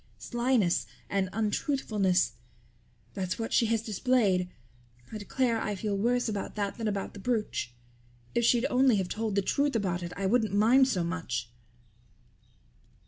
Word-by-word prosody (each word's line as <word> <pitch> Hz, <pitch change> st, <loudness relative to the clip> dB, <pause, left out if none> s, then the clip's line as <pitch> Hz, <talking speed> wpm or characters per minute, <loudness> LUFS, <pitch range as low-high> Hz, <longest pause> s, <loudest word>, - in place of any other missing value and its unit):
Slyness 240 Hz, -7 st, +1 dB, 0.2 s
and 195 Hz, -2 st, 0 dB
untruthfulness 210 Hz, -4 st, +1 dB, 0.8 s
that's 185 Hz, -2 st, -3 dB
what 225 Hz, 0 st, -4 dB
she 230 Hz, -, +4 dB
has 225 Hz, -1 st, 0 dB
displayed. 210 Hz, -5 st, +1 dB, 0.6 s
I 215 Hz, -, -5 dB
declare 230 Hz, +2 st, 0 dB
I 210 Hz, -, -2 dB
feel 205 Hz, +1 st, -2 dB
worse 245 Hz, +5 st, +1 dB
about 205 Hz, -3 st, -4 dB
that 205 Hz, +1 st, -3 dB
than 225 Hz, -, -1 dB
about 200 Hz, -2 st, -3 dB
the 205 Hz, -, -9 dB
brooch. 210 Hz, -, -2 dB, 0.6 s
If 235 Hz, -, +1 dB
she'd 235 Hz, +1 st, +3 dB
only 255 Hz, -1 st, +4 dB
have 190 Hz, -3 st, -1 dB
told 220 Hz, -2 st, -2 dB
the 200 Hz, -, +2 dB
truth 280 Hz, +5 st, +1 dB
about 185 Hz, -5 st, 0 dB
it 170 Hz, 0 st, -5 dB
I 195 Hz, -, -2 dB
wouldn't 220 Hz, 0 st, +2 dB
mind 245 Hz, +6 st, +5 dB
so 185 Hz, -9 st, 0 dB
much." 125 Hz, -9 st, -3 dB
210 Hz, 150 wpm, -29 LUFS, 190-235 Hz, 0.8 s, mind